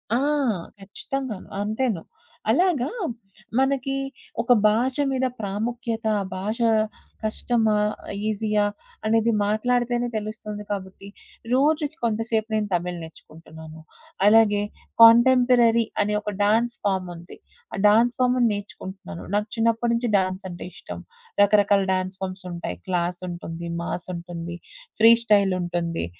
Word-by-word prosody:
ఆ! - - +3 0.6
ఖచ్చితంగాను. 215 +3 -5
అంతేను. 215 -2 -1 0.5
అలాగా 295 -2 +2 0.7
మనకి 270 0 +1 0.5
ఒక 235 - 0 0.2
భాష 240 +5 +1 0.2
మీద 260 -1 0
ప్రాముఖ్యత, 225 +3 -3
ఆ - - -1 0.2
భాషా 225 +4 0 0.5
కష్టమా? 220 0 +1 0.5
ఈజీయా? 210 -1 +1 0.4
అనేది 225 +1 +3
మాట్లాడితేనే 240 +3 0
తెలుస్తుంది 215 -1 -5
కాబట్టి, 195 0 -6 0.5
రోజుకి 300 +3 +2
కొంతసేపు 225 -1 0
నేను 215 -1 0
తమిళ్ 175 0 -1
నేర్చుకుంటున్నాను. 160 0 -12 0.5
అలాగే 210 -1 +5 0.4
కాంటెంపరరీ 235 0 +6 0.2
అనే 210 +1 -1
ఒక 210 - -4
డాన్స్ 230 +3 +2
ఫార్మ్ 190 -2 0
ఉంది. 170 +2 -12 0.4
ఆ - - -2
డాన్స్ 230 +3 +4
ఫార్మ్‌ని 250 -1 +3
నేర్చుకుంటున్నాను. 190 - -8
నాకు 210 +1 0
చిన్నప్పటి 230 +1 +1
నుంచి 235 0 -1
డాన్స్ 185 0 -2
అంటే 175 0 -8
ఇష్టం. - - -9 0.4
రకరకాల 205 -1 +4
డాన్స్ 185 0 -2
ఫార్మ్స్ 185 0 -5
ఉంటాయి. 170 - -5
క్లాస్ 175 -1 -1
ఉంటుంది. 170 -1 -6
మాస్ 175 0 -4
ఉంటుంది. 170 0 -6 0.4
ఫ్రీస్టైల్ 215 -4 +5
ఉంటుంది. 175 -1 -2
215 Hz, 110 wpm, -24 LUFS, 185-235 Hz, 0.7 s, కాంటెంపరరీ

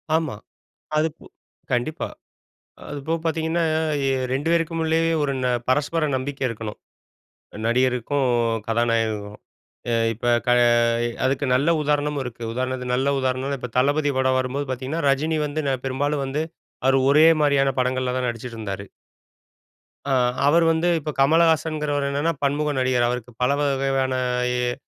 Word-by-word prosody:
ஆமா. 160 -8 -1 0.6
அது 155 +1 +3
பு - - -16 0.5
கண்டிப்பா. 125 +7 -1 0.8
அதுப்போக 145 +3 -2
பார்த்தீங்கன்னா, 165 +1 0 0.4
இ - - +1 0.3
2 140 +4 -1
பேருக்கும் 165 -1 0
உள்ளேயே 165 +1 +2
ஒரு 140 -1 0
ந - - +2 0.2
பரஸ்பர 150 +4 +1
நம்பிக்கை 135 +1 -4
இருக்கணும். 110 -2 -6 0.9
நடிகருக்கும், 130 +3 +1 0.4
கதாநாயகருக்கும். 115 -3 0 0.5
எ - - +2 0.2
இப்ப 115 - -12 0.2
க - - +2 0.7
அதுக்கு 135 +2 +1
நல்ல 140 +6 +2
உதாரணமும் 150 -1 0
இருக்கு. 120 -1 -8
உதாரணத்துக்கு 125 0 -2
நல்ல 130 +2 +1
உதாரணம்ன்னா, 130 +2 -1
இப்ப 125 - -6
தளபதி 145 +2 +2
படம் 130 0 +2
வரும்போது 135 +2 -2
பார்த்தீங்கன்னா, 130 +6 -3
ரஜினி 155 +4 +1
வந்து 150 +2 -3
ந - - +2
பெரும்பாலும் 140 +2 -1
வந்து 140 +3 -2 0.4
அவரு 135 0 +4
ஒரே 155 +3 +6 0.2
மாரியான 140 -2 +3
படங்கள்ல 130 0 0
தான் 125 -1 -1
நடிச்சுட்டுருந்தாரு. 110 -4 -6 1.3
ஆ - - +3 0.3
அவரு 165 +3 +4
வந்து 165 +2 +1
இப்ப 155 0 -5
கமலஹாசன்ங்கிறவர் 155 -1 +2
என்னன்னா 145 +4 0
பன்முக 145 +2 +1
நடிகர். 130 -2 +2
அவருக்கு 125 0 -4
பல 125 - +3
வக 145 - +2 0.2
வகையான 130 -1 0 0.4
ய் 125 0 0
135 Hz, 135 wpm, -23 LUFS, 125-150 Hz, 1.3 s, ஒரே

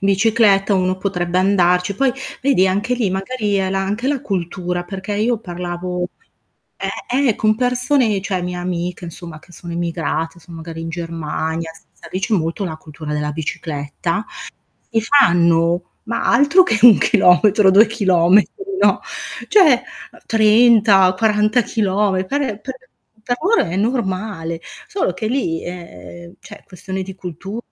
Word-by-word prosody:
bicicletta 200 0 +3
uno 185 0 0
potrebbe 180 -2 -2
andarci, 180 0 +2
poi 270 +5 +2 0.3
vedi 260 -9 +3
anche 205 +6 0
lì 230 -6 -1
magari 205 +2 -2
è 190 -1 0
la 195 0 -1
anche 210 +7 -2
la 280 -3 -1
cultura, 180 -1 -3
perché 190 +2 -6
io 225 +3 0
parlavo 180 -2 -5 0.7
eh, 270 +3 -2
eh 220 - +1
con 215 0 +1
persone, 250 -2 +1
cioè, 190 -1 -2
mie 180 0 -4
amiche, 175 0 -4
insomma, 170 -2 -10
che 175 - -20
sono 170 -1 -9
emigrate, 165 -1 -3
sono 170 0 -12
magari 165 0 -8
in 165 - -5
Germania, 165 -1 -4 0.2
sai - - -15
lì 185 - -2
c'è 220 +3 -1
molto 165 +3 -2
la 160 -3 -5
cultura 155 -1 -8
della 150 0 -2
bicicletta 160 +4 -4 0.7
e 225 - +1
fanno, 175 -8 +2
ma 230 +1 -3
altro 285 +9 +5
che 225 -12 0
1 235 -4 +9
chilometro, 200 0 +4
2 205 +4 +6
chilometri, 195 -3 +3 0.3
no. - - +3 0.5
Cioè, 310 - +5 0.4
30, 215 -3 +5
40 215 +3 +2
chilometri 200 -3 0
per 230 -8 -3
per 260 - -6 0.5
per 245 - 0
loro 420 +7 +3
è 170 - -4
normale. 190 -6 -2 0.3
Solo 375 - -2
che 185 +5 -5
lì 215 -9 -1
è 90 - -10
cioè, - - -13
questione 190 +1 -6
di 190 0 -9
cultu 190 +4 -7
190 Hz, 145 wpm, -18 LUFS, 175-220 Hz, 0.7 s, 1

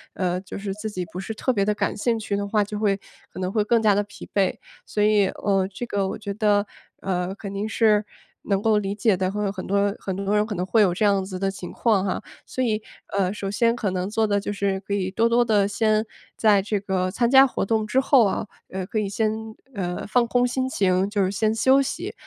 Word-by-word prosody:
呃， 180 -1 -1
就 195 - -8
是 200 -1 -4
自 215 +2 -5
己 185 -3 -4
不 180 - -5
是 220 - -5
特 255 +4 0
别 200 -3 +1
地 210 +1 +1
感 - - -1
兴 230 +2 0
趣 210 -2 -2
的 200 0 -2
话， 210 +1 +1
就 210 0 -5
会 200 -2 +1 0.3
可 - - -9
能 185 0 -1
会 210 +1 +1
更 230 +1 +2
加 210 -2 +4
地 205 - +2
疲 205 - -12
惫。 195 -2 +2 0.3
所 210 - -2
以 210 -2 +4
呃， 195 -1 0
这 245 - -4
个 200 -4 -1
我 - - -4
觉 200 -2 -5
得， 205 -1 +2 0.3
呃， 180 -1 -2
肯 200 -2 -7
定 205 +2 -2
是 215 -2 +3 0.4
能 200 -1 +1
够 220 -1 +3
理 200 -1 -1
解 215 -2 +2
的， 185 +1 -1
会 210 - -3
有 - - 0
很 190 -2 -7
多 200 +1 +1
很 190 - -4
多 200 +1 0
人 210 0 +3
可 215 - -4
能 180 +1 -2
会 220 +3 +3
有 185 -4 +4
这 210 +4 +1
样 200 -2 +3
子 185 -1 -6
的 195 0 0
情 190 -2 -7
况 215 -5 +2
哈。 190 - -2 0.2
所 255 - -4
以 220 -3 0 0.4
呃， 190 0 +1
首 195 -2 -4
先 230 +3 +2
可 215 -5 -2
能 185 +1 -2
做 220 0 +1
的 205 0 +1
就 205 0 -2
是， 195 -1 -1
可 200 +1 -5
以 190 -2 0
多 230 +4 +2
多 240 +1 +3
地 210 -3 +3
先 215 +1 +1 0.3
在 210 -3 +4
这 205 +1 -1
个 185 -2 -1
参 235 +5 0
加 270 0 +8
活 245 - -2
动 220 0 0
之 260 +5 +2
后 265 -3 +5
啊 200 - -1 0.2
呃， 190 -1 -5
可 215 - -2
以 205 - -1
先 215 +2 0 0.4
呃， 180 -3 -3
放 235 +1 +2
空 245 +1 +2
心 260 +1 -1
情， 190 -4 +1
就 205 -2 +1
是 185 - 0
先 215 +2 0
休 265 +4 +4
息。 270 - -4
205 Hz, 270 characters per minute, -24 LUFS, 195-220 Hz, 0.4 s, 加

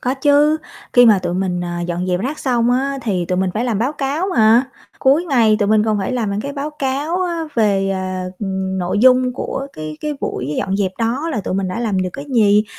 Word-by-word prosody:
Có 255 +2 -1
chứ, 290 +3 +3 0.3
khi 245 0 +7
mà 215 -3 +6
tụi 175 -1 -3
mình, 180 -1 -1
à, 175 0 -4
dọn 175 +1 -3
dẹp 180 -1 0
rác 280 +8 -3
xong 240 -3 +1
á, 275 +2 0
thì 190 -6 -1
tụi 180 +1 -1
mình 190 0 +1
phải 225 +3 -1
làm 230 -5 -1
báo 250 +6 0
cáo 290 +4 -2
mà. 225 +3 +5 0.3
Cuối 280 +6 +3
ngày 235 -9 +3
tụi 205 -2 +1
mình 215 0 +3
còn 215 -1 +1
phải 195 +5 -2
làm 230 -5 -1
những 200 +1 -2
cái 280 +5 -5
báo 285 +1 -4
cáo 285 +6 -1
á, 340 -2 -2
về, 200 -4 +2
à, 185 -1 -3 0.5
nội 180 +2 -1
dung 255 +2 +4
của 270 +1 -4
cái 155 0 -7
cái 300 - -2
buổi 135 +4 -3
dọn 190 - -1
dẹp 195 -2 -1
đó 245 +8 -1
là 270 - -2
tụi 185 - -3
mình 190 -1 -1
đã 185 +6 -4
làm 215 -5 0
được 185 - -3
cái 280 - -7
gì, 210 -2 +4
225 Hz, 240 wpm, -18 LUFS, 190-270 Hz, 0.5 s, khi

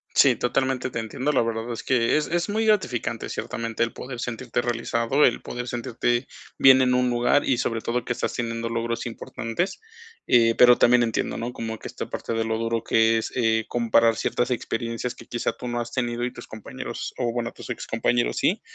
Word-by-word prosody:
Sí, 130 -3 +6
totalmente 130 +2 0
te 120 - -4
entiendo. 125 +6 -2
La 135 - +3
verdad 115 +1 -2
es 115 - -5
que 120 0 +2
es 150 - 0
es 175 +2 -1
muy 220 +2 0
gratificante 125 - 0
ciertamente 115 -1 -3
el 115 - -2
poder 125 -2 -7
sentirte 120 0 -2
realizado, 115 +3 0
el 120 - +3
poder 125 0 -6
sentirte 120 +1 -1 0.3
bien 130 -1 +7
en 125 -1 +3
un 125 0 +2
lugar 120 +4 +2
y 130 - +2
sobre 115 -3 -1
todo 120 +1 -1
que 120 - -2
estás 120 - -3
teniendo 115 -1 -3
logros 115 0 -2
importantes. 115 - -4 0.5
Eh, 115 -2 +5
pero 125 0 +7
también 120 0 +5
entiendo, 115 -1 -1
¿no?, 120 +2 -4
como 110 -1 -5
que - - -7
esta - - -6
parte - - -4
de 115 - 0
lo 110 0 -1
duro 115 0 -1
que 115 0 +3
es, - - -4
eh, 110 -2 +2
comparar 115 -1 +3
ciertas 120 +2 -1
experiencias 120 +1 -3
que - - -13
quizás 120 - -2
tú 125 - -6
no 120 0 -2
has 120 0 -4
tenido 120 -2 -2
y 125 - -3
tus 120 - -10
compañeros 110 -1 -7
o 120 -2 0
bueno, 120 0 -3
tus - - -11
excompañeros 120 0 0
sí. - - +1
120 Hz, 205 wpm, -24 LUFS, 115-125 Hz, 0.5 s, bien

